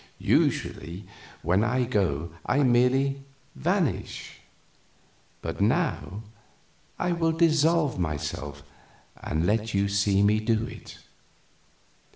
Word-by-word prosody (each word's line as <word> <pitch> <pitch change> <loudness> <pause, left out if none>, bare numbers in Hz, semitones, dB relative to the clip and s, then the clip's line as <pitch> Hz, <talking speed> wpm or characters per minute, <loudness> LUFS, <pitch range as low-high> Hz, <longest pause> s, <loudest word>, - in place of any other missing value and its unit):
Usually 90 +4 0 0.4
when 90 +5 +2
I 125 +3 +1
go 85 - 0 0.2
I 140 +3 +3
merely 130 +2 +3 0.3
vanish; 65 - -2 1.0
but - - -4
now 100 +4 0 0.7
I 180 - 0
will 165 -1 +1
dissolve 160 - +3
myself 75 -3 -4 0.6
and 80 +2 -1
let 110 +1 0
you 100 +1 +2
see 100 0 +2
me 105 +1 +4
do 110 0 0
it." - - -10
110 Hz, 100 wpm, -26 LUFS, 90-135 Hz, 1.0 s, me